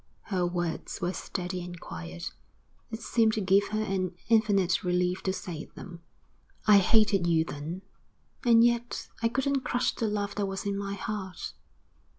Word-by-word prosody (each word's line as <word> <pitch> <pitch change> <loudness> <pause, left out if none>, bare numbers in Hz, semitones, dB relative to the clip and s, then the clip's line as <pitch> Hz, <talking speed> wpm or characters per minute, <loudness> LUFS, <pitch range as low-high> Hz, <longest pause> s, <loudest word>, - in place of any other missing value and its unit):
Her 180 -2 +2
words 175 -2 -3
were 175 +1 -1
steady 180 -1 -4
and 175 -1 -8
quiet. 80 - -6 0.6
It 225 0 -6
seemed 225 -3 +3
to 220 - 0
give 195 +1 +4
her 215 0 -1
an 185 -3 -1
infinite 205 -5 +3
relief 180 0 +1
to 190 - 0
say 170 -4 -5
them. 175 -2 -9 0.6
'I 210 -2 +8
hated 200 -2 +4
you 160 -1 +3
then, 160 +6 -6 0.6
and 230 -2 +6
yet 240 0 +1
I 230 - +4
couldn't 270 +4 +1
crush 245 -1 0
the 225 - -1
love 205 -1 -1
that 205 -1 +1
was 195 +1 -4
in 200 0 0
my 200 0 -3
heart. 195 -2 -5
195 Hz, 165 wpm, -29 LUFS, 180-215 Hz, 0.6 s, I